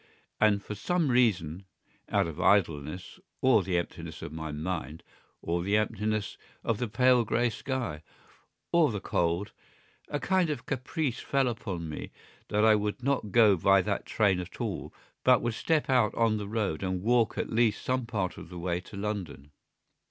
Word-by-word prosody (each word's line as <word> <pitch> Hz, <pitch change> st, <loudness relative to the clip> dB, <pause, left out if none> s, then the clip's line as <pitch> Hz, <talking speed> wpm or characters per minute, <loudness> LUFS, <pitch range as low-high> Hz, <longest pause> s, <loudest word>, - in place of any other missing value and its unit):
And 105 Hz, -2 st, +3 dB
for -, -, -5 dB
some 160 Hz, -, 0 dB
reason, 95 Hz, -8 st, +1 dB, 0.4 s
out -, -, +2 dB
of 80 Hz, -3 st, -5 dB
idleness 85 Hz, -4 st, +1 dB, 0.2 s
or 130 Hz, -5 st, +5 dB
the 90 Hz, -1 st, -1 dB
emptiness 85 Hz, -2 st, -5 dB
of 75 Hz, -, -7 dB
my 80 Hz, -1 st, -5 dB
mind 80 Hz, 0 st, -4 dB, 0.4 s
or 85 Hz, +1 st, -1 dB
the 100 Hz, +4 st, +2 dB
emptiness 110 Hz, -1 st, -1 dB, 0.2 s
of 115 Hz, -2 st, 0 dB
the 125 Hz, -, -1 dB
pale 125 Hz, +2 st, +4 dB
grey 120 Hz, +2 st, +1 dB
sky, 120 Hz, -, -4 dB, 0.7 s
or 170 Hz, -6 st, +4 dB
the 105 Hz, -, -3 dB
cold, 85 Hz, +3 st, -1 dB, 0.6 s
a 145 Hz, -, -2 dB
kind 185 Hz, -1 st, +2 dB
of 135 Hz, -6 st, -4 dB
caprice 135 Hz, 0 st, -2 dB
fell 135 Hz, -2 st, +1 dB
upon 100 Hz, -8 st, -4 dB
me 75 Hz, -, -6 dB, 0.4 s
that 105 Hz, +1 st, +2 dB
I 110 Hz, -, +7 dB
would 105 Hz, +3 st, -1 dB
not 130 Hz, -6 st, 0 dB
go 110 Hz, -3 st, +6 dB
by 95 Hz, +2 st, +4 dB
that 100 Hz, 0 st, -2 dB
train 100 Hz, -4 st, +2 dB
at 90 Hz, -, -8 dB
all, -, -, -3 dB, 0.3 s
but 125 Hz, -4 st, +5 dB
would 120 Hz, -1 st, 0 dB
step 155 Hz, +6 st, 0 dB
out 125 Hz, -5 st, +3 dB
on 115 Hz, -2 st, +2 dB
the 105 Hz, -1 st, -5 dB
road 105 Hz, -8 st, -1 dB
and 95 Hz, -1 st, -2 dB
walk 120 Hz, 0 st, +2 dB
at -, -, -2 dB
least 115 Hz, -2 st, +1 dB
some 130 Hz, -2 st, 0 dB
part 105 Hz, -6 st, -2 dB
of -, -, -11 dB
the 90 Hz, -, -8 dB
way 85 Hz, 0 st, -1 dB
to 100 Hz, +3 st, -11 dB
London. 100 Hz, -9 st, -5 dB
105 Hz, 175 wpm, -29 LUFS, 90-120 Hz, 0.7 s, I